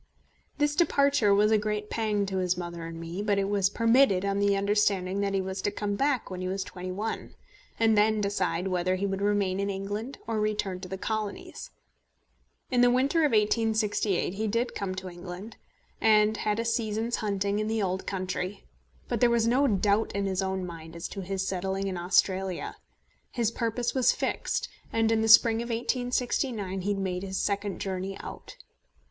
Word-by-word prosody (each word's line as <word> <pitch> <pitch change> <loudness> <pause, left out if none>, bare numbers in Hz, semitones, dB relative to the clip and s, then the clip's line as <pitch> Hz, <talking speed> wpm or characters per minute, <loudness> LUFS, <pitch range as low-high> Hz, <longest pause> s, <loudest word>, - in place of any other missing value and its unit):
This 295 0 +1
departure 280 - +3
was 210 +2 +4
a 215 - +5
great 210 0 -3
pang 210 -3 0
to 190 -1 -3
his 180 -1 +1
mother 170 -1 -5
and 165 0 -7
me; 165 +4 -5
but 205 -1 +1
it 195 0 +1
was 200 -1 +2
permitted 230 -3 +3
on 200 0 0
the 200 0 +3
understanding 200 -1 +1
that 200 -1 0
he 195 - +1
was 190 0 -4
to - - 0
come 205 0 -3
back 265 0 0
when 185 0 -5
he 185 - -2
was 190 +1 -2
twenty 185 -1 -7
one, 215 +4 -4 0.4
and 225 -1 +4
then 215 +1 +3
decide 195 -3 -1
whether 185 0 +1
he 190 +2 -1
would 195 0 -2
remain 200 -2 +1
in 200 0 -1
England 205 +6 -4
or 225 -1 -1
return 210 -3 -1
to 185 - -8
the 190 - -4
Colonies. 215 0 -4 1.0
In 250 -1 +3
the 245 - +6
winter 265 +6 +2
of 300 -3 +3
1868 215 -3 +1
he 215 +2 -2
did 230 +4 0
come 190 -2 -3
to 190 0 -6
England, 180 +4 -8 0.4
and 215 0 +5
had 210 0 0
a 230 - -1
season's 230 0 -1
hunting 200 -1 -1
in 215 - -1
the 220 -1 0
old 190 0 -2
country; 185 +1 -3 0.4
but 240 - -1
there 245 - +6
was 235 -1 +2
no 260 +5 +3
doubt 205 0 +1
in 200 0 -1
his 190 -1 0
own 190 -1 -2
mind 165 -1 -9
as 170 - -5
to 195 - -6
his 190 +1 -3
settling 190 +1 -2
in 190 -1 -2
Australia. 185 +1 0 0.6
His 230 -3 0
purpose 230 +1 -1
was 260 -2 +4
fixed, - - -2 0.2
and 225 0 +2
in 225 -1 +2
the 225 - +1
spring 225 +1 +7
of 235 - -5
1869 240 -4 -1
he 205 +2 0
made 185 -2 -2
his 190 -1 -4
second 200 -1 -1
journey 190 0 -3
out. - - -9
200 Hz, 190 wpm, -28 LUFS, 190-225 Hz, 1.0 s, spring